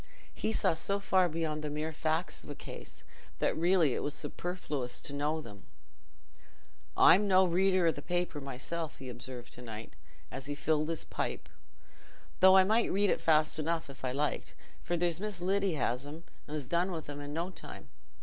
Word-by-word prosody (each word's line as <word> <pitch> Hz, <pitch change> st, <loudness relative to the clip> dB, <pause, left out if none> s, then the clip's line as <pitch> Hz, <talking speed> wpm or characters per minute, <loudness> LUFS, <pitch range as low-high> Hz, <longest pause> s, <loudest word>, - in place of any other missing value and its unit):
He 220 Hz, -, -1 dB
saw 220 Hz, -, +2 dB
so 195 Hz, +5 st, 0 dB
far 185 Hz, -2 st, +3 dB
beyond 155 Hz, -1 st, -2 dB
the 150 Hz, -, -2 dB
mere 155 Hz, +2 st, -2 dB
facts 160 Hz, +2 st, -1 dB
of -, -, -12 dB
a -, -, -5 dB
case -, -, -9 dB, 0.3 s
that -, -, +1 dB
really 170 Hz, -4 st, +3 dB
it -, -, -2 dB
was 145 Hz, -, -2 dB
superfluous 150 Hz, -8 st, -3 dB
to 140 Hz, -, -7 dB
know 150 Hz, +2 st, 0 dB
them. 100 Hz, -8 st, -12 dB, 1.3 s
"I'm 205 Hz, +3 st, +7 dB
no 190 Hz, -1 st, +6 dB
reader 185 Hz, +1 st, +3 dB
o' 165 Hz, -, +5 dB
the -, -, -7 dB
paper 175 Hz, -4 st, -2 dB
myself," 140 Hz, +5 st, -4 dB
he 130 Hz, -1 st, -8 dB
observed 125 Hz, 0 st, -8 dB
to 125 Hz, -, -8 dB
night, 110 Hz, -2 st, -8 dB, 0.4 s
as 135 Hz, +1 st, -6 dB
he 145 Hz, -, -3 dB
filled 155 Hz, +2 st, +1 dB
his 165 Hz, -, -1 dB
pipe, -, -, -3 dB, 0.9 s
"though 190 Hz, +1 st, +8 dB
I 190 Hz, -, +8 dB
might 220 Hz, +4 st, +2 dB
read 200 Hz, 0 st, +3 dB
it -, -, 0 dB
fast 155 Hz, -1 st, +3 dB
enough 160 Hz, -1 st, -1 dB
if 135 Hz, -, -15 dB
I 130 Hz, -, 0 dB
liked, 145 Hz, +3 st, -2 dB, 0.3 s
for 175 Hz, -, -1 dB
there's 170 Hz, -1 st, +1 dB
Miss 210 Hz, -2 st, -3 dB
Lyddy 190 Hz, 0 st, +1 dB
has 125 Hz, 0 st, -1 dB
'em 155 Hz, +3 st, -8 dB, 0.2 s
and 150 Hz, +1 st, -3 dB
's 140 Hz, -, -4 dB
done 175 Hz, +6 st, +1 dB
with 165 Hz, -3 st, -5 dB
'em 145 Hz, 0 st, -6 dB
i' 145 Hz, -, -6 dB
no 165 Hz, +5 st, -3 dB
time. -, -, -10 dB
160 Hz, 195 wpm, -32 LUFS, 145-180 Hz, 1.3 s, though